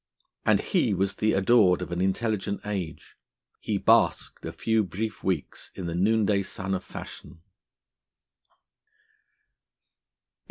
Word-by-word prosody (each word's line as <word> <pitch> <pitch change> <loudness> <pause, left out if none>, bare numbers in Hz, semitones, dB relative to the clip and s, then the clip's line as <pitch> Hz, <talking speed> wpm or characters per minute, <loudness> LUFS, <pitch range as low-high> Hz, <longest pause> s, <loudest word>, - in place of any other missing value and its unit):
And - - +4
he 100 - +1
was 95 +1 -1
the 110 0 +2
adored 95 -2 +4
of - - -8
an 85 +1 -2
intelligent 100 +1 -1
age; 95 -6 -5 0.4
he - - -1
basked - - +2
a - - -4
few 110 -1 +1
brief 105 +4 -5
weeks 90 -6 -3
in 95 - -5
the 85 - -3
noonday 105 +2 +2
sun 95 0 -4
of 95 -1 -2
fashion. 80 - -10
95 Hz, 120 wpm, -27 LUFS, 90-110 Hz, 0.4 s, And